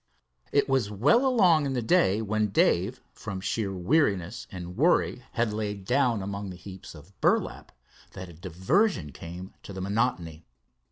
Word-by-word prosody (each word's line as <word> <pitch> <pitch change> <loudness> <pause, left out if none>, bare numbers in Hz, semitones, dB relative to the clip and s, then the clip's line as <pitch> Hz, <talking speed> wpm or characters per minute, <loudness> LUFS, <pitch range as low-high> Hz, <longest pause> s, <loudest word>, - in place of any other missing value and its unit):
It 140 - +3
was 135 -6 +1
well 145 - +3
along 180 - +4
in 135 - -2
the 125 - -1
day, 110 - +3
when 110 0 0
Dave 100 +4 +1
from 100 -4 -6
sheer 100 +1 -2
weariness 100 - 0
and 90 -1 -7
worry 155 -2 +2
had 115 -3 0
lain 105 -2 -3
down 120 -2 +1
among 100 0 -5
the 90 - -7
heaps 95 -1 -11
of 80 +6 -15
burlap, - - 0 0.4
that 95 - -7
a 85 - -12
diversion 95 - 0
came 90 +6 -9
to 95 -1 -8
monotony. 95 -6 -1
105 Hz, 155 wpm, -27 LUFS, 95-130 Hz, 0.4 s, along